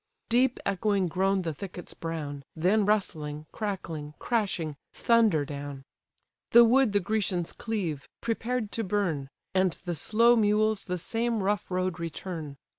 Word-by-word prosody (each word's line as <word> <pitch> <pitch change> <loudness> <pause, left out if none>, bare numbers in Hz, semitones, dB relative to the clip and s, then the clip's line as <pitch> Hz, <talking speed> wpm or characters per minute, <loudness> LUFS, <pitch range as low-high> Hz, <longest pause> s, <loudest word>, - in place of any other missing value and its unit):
Deep 245 +2 +3
echoing 200 0 +1
groan 190 +2 +1
the 165 -2 -2
thickets 180 +2 -8
brown; 150 -4 -5
Then 195 +6 +2
rustling, 155 -8 0
crackling, 165 -8 -4
crashing, 190 -10 -1 0.2
thunder 220 -11 +3
down. 140 -1 -6 0.7
The 235 +1 +10
wood 245 -1 +4
the 205 - +4
Grecians 185 -3 -1
cleave, 180 - -3
prepared 230 -1 -2
to 225 - -2
burn; 180 -9 -1 0.2
And 185 -2 +3
the 175 - -1
slow 230 +8 +4
mules 215 -1 +2
the 180 0 -2
same 225 +4 0
rough 205 +1 0
road 185 -1 -1
return. 165 -3 -5
190 Hz, 135 wpm, -28 LUFS, 165-220 Hz, 0.7 s, The